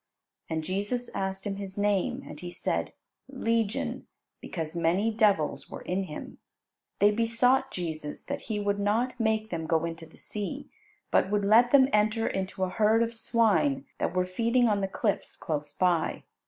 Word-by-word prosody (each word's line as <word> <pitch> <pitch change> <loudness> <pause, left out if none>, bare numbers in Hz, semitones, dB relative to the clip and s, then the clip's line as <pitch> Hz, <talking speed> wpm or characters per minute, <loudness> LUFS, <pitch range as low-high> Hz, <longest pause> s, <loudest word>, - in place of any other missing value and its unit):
And 160 -1 -2
Jesus 205 +8 -2
asked 190 0 -3
him 195 -1 -2
his 195 -1 -7
name. 205 +6 +1
And - - -9
he 175 - -6
said, - - -2 0.4
"Legion," 230 -5 -1 0.3
because 160 -1 -5
many 180 +7 +1
devils 205 -8 +2
were - - -8
in 190 +2 -1
him. 150 -4 -8 0.6
They 205 +1 +5
besought 240 +4 +2
Jesus 155 -4 -5
that - - -4
He 210 -2 -1
would 205 0 0
not 230 +5 0
make 220 -1 0
them 165 -2 -3
go 165 0 +2
into 165 -1 -6
the - - -19
sea, 210 -2 -5 0.4
but - - +3
would 205 0 +1
let 230 +4 +6
them 265 0 +6
enter 215 +2 +2
into 190 0 -2
a 185 - 0
herd 220 +4 +3
of 230 0 -3
swine 235 +5 +2
that - - -1
were 180 0 +2
feeding 230 +6 +2
on 205 -2 +1
the 195 - 0
cliffs 200 +1 -2
close 150 -2 -3
by. 175 0 +1
205 Hz, 170 wpm, -28 LUFS, 185-230 Hz, 0.6 s, let